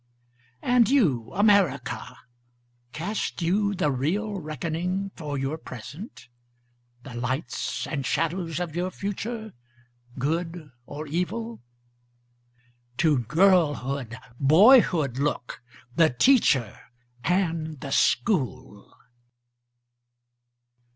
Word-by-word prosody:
And 245 -2 +4
you 145 - +2
America, 185 - +2 0.7
Cast 185 +3 -3
you 200 +4 +1
the 165 -6 +1
real 195 - -1
reckoning 170 +5 -3
for 150 -4 -4
your 135 +4 -3
present? 155 - -10 0.8
The 130 - -10
lights 125 +5 -3
and 145 -4 -3
shadows 165 +4 -1
of 170 -3 -4
your 180 +1 -1
future, 215 +3 -5 0.6
good 165 +3 -3 0.2
or 150 +2 -6
evil? 200 +9 -3 1.4
To 155 -5 +3
girlhood, 140 - +2 0.2
boyhood 160 - +5
look, 140 -4 -2 0.3
the 165 -1 +5
teacher 135 - +3 0.4
and 165 -4 -1
the 135 +1 -7
school. 130 - 0
160 Hz, 85 wpm, -26 LUFS, 135-195 Hz, 1.4 s, boyhood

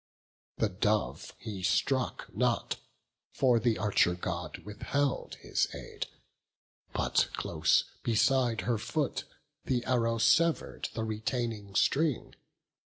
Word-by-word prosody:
The 110 - +2
dove 105 +2 -1
he 105 -4 -6
struck 125 +7 +1
not, - - +1 0.6
for 125 -3 +4
the 115 -1 +2
Archer 100 -4 +3
God 90 - -4
Withheld 130 +7 -1
his - - +1
aid; - - -6 0.8
but - - +2
close - - +2 0.2
beside 120 +1 +2
her 115 -3 0
foot 125 +6 -1 0.4
The 125 -2 0
arrow 115 -2 +2
sever'd 165 +9 +2
the 110 - -1
retaining 110 -2 -3
string. 135 - +2
115 Hz, 105 wpm, -31 LUFS, 105-130 Hz, 0.8 s, for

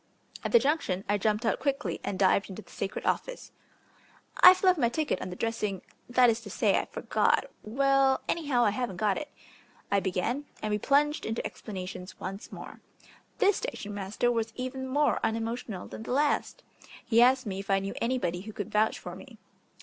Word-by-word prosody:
At - - -2
the 475 - +8
junction 285 - 0
I 205 +1 +1
jumped 215 +3 0
out 220 - +1
quickly 275 0 -1
and 195 - -3
dived 195 +1 +3
into 195 +3 -8
the - - -19
sacred 195 - -4
office. - - -2 0.9
"I've 370 -5 +8
left 365 -3 +5
my 235 - +3
ticket 290 -6 -1
on - - -4
the 180 - -6
dressing 210 -3 -2 0.3
that 245 0 +5
is 230 0 +1
to 215 - -10
say, - - +2
I - - -3
forgot - - +1 0.2
Well, 270 +3 +2
anyhow, 285 -7 +1
I 210 - +3
haven't 235 -2 -3
got 210 +3 +1
it," 300 -1 -7 0.6
I 200 - +4
began, 195 +9 -2
and 215 - -3
we 210 - +1
plunged 295 +5 +2
into 225 +1 -3
explanations 185 -2 -7
once 195 +2 -7
more. - - -10 0.6
This 400 0 +3
station 205 0 -5
master 205 +4 -1
was 225 -1 -1
even 260 +1 -4
more 290 +3 +2
unemotional 225 -3 -2
than - - -8
the 225 - -4
last. 295 - 0 0.4
He 230 0 +4
asked 255 +1 +5
me 195 -2 -4
if 195 - -8
I 195 - +4
knew 195 0 -3
anybody 205 -8 -1
who 215 +2 -9
could 205 - -5
vouch 215 +1 +2
for - - -8
me. - - -13
225 Hz, 190 wpm, -29 LUFS, 200-270 Hz, 0.9 s, the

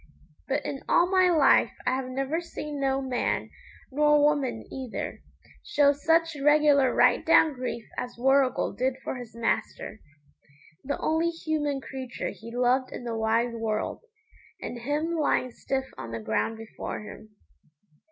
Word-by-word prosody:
But 280 +1 -1
in 275 - -4
all 350 +2 +4
my 370 -1 +5
life 310 -6 +4
I 250 - +2
have 260 0 -2
never 270 +6 -2
seen 300 -3 -6
no 270 0 0
man, 255 -2 -1 0.4
nor 295 +2 +4
woman 275 -6 +1
neither, 260 -4 -5 0.4
show 285 -1 +3
such 325 +3 +2
regular 295 -3 +5
right - - +4
down 315 - +5
grief 250 -3 -5
as 245 -1 -5
Warrigal 270 +1 +2
did 255 +1 0
for - - -4
his 235 -3 -10
master 230 -1 -2 0.8
the 285 - -2
only 320 +2 +1
human 310 -4 -2
creature 260 -2 -5
he 230 +1 -11
loved 250 +2 +1
in - - -7
the 235 -1 -3
wide 225 +2 +1
world, 220 -2 -2 0.6
and 245 - -6
him 295 +7 -1
lying 285 -5 +1
stiff 265 +2 -3
on 115 -3 -6
the 115 0 -4
ground 110 - -1
before 225 0 -6
him. 210 0 -12
265 Hz, 150 wpm, -27 LUFS, 240-295 Hz, 0.8 s, my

